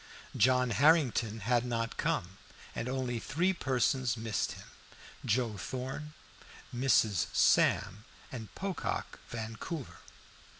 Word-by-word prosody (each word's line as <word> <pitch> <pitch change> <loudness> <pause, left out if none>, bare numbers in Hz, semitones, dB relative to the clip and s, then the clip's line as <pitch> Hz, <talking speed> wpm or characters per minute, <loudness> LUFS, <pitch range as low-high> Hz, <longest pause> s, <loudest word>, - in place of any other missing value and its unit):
John 125 -1 +3
Harrington 120 - +3
had 120 +3 +2
not 115 -2 -2
come, 90 +2 -1 0.3
and 120 - -3
only 130 -2 -2
three 175 +11 +1
persons 130 -5 +1
missed 110 -2 -1
him - - -11 0.6
Joe 115 -1 0
Thorn, 130 +7 -5 0.6
Mrs. 110 -8 +3
Sam, 105 +3 +3 0.3
and 115 -4 -6
Pocock 195 -1 -3
Vancouver. 115 +6 -6
120 Hz, 100 wpm, -32 LUFS, 110-130 Hz, 0.6 s, John